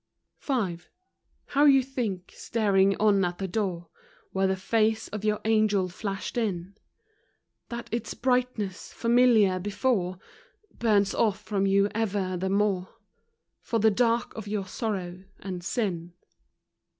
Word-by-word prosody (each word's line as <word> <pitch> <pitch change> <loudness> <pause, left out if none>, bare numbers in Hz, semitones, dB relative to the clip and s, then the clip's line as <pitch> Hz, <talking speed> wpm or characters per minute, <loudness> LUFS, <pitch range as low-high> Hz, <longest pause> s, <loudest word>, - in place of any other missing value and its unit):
V - - -5 0.2
v. 170 - -17 0.7
How 290 +1 +4
you 270 -2 +6
think, 225 -9 -4
staring 195 -3 +2
on 205 -2 +4
at 175 0 -1
the 195 - -3
door, 180 -4 -2 0.4
Where 190 0 +1
the 190 - +1
face 220 +3 +1
of 210 -1 -6
your 210 0 +1
angel 215 -4 +2
flashed 195 +4 -4
in, 195 -4 -3 0.9
That 235 0 -6
its 230 -2 -3
brightness, 250 -6 -1
familiar 230 -5 +4
before, 200 -2 0 0.6
Burns 205 -4 +2
off 215 -4 +1
from 195 -2 -1
you 200 +1 +4
ever 200 -4 -1
the 190 +2 -2
more 195 -2 0 0.7
For 230 - -1
the 220 0 +4
dark 235 +2 +1
of 220 -2 -7
your 205 -1 -2
sorrow 185 -3 -4
and 185 -2 -6
sin. 175 -5 -2
205 Hz, 135 wpm, -27 LUFS, 190-225 Hz, 0.9 s, you